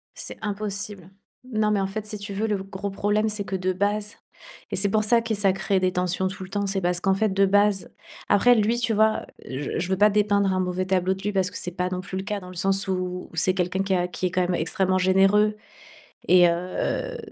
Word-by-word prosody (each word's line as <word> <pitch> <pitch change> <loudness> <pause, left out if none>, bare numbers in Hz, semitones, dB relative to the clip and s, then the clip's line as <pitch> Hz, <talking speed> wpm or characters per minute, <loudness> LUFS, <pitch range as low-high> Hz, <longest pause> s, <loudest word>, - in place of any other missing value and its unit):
C'est - - -4
impossible. 205 -2 -4 0.4
Non 215 -2 +1
mais 205 - +2
en 195 - 0
fait, 215 +2 -5
si 210 0 -5
tu 200 0 -6
veux, 215 +3 -1
le 210 - 0
gros 195 +1 -5
problème 210 +2 0
c'est 210 -1 -2
que 195 - -3
de 185 0 0
base 205 +2 -1 0.6
et - - -1
c'est 200 +2 +2
pour 215 +2 +2
ça 230 +2 +4
que 230 -1 -2
ça 200 -2 +2
crée 195 0 0
des 185 0 +1
tensions 180 +1 0
tout 190 0 -6
le 185 - -10
temps, 200 0 -2
c'est 195 0 -1
parce 175 0 0
qu'en 190 +1 +1
fait 215 +2 +1
de 195 +1 +3
base 205 0 +2 0.4
après 245 +5 +5
lui 220 +2 +2
tu 235 -2 +1
vois, 220 +1 +2 0.2
je 135 +4 -4
je 175 - -3
veux 190 - +1
pas 210 +1 +5
dépeindre 200 -2 +2
un 185 - 0
mauvais 185 0 -1
tableau 185 0 +1
de 190 - -12
lui, 210 - -1
parce 190 -2 0
que - - -6
c'est 180 - -3
pas 180 +1 -2
non 185 0 -3
plus 190 0 -6
le 190 - -3
cas 210 0 -3
dans 180 -1 -11
le 185 - -11
sens 195 +2 +2
où-où 180 -1 -3
c'est 175 +3 +2
quelqu'un 185 +1 0
qui 195 -1 -1
a 180 0 0
qui 180 - -4
est 180 - -5
quand 185 -1 +1
même 180 0 0
extrêmement 185 +2 +1
généreux 195 +3 +3 0.7
et 180 -1 +6
heu 185 - -2
195 Hz, 250 wpm, -24 LUFS, 185-210 Hz, 0.7 s, et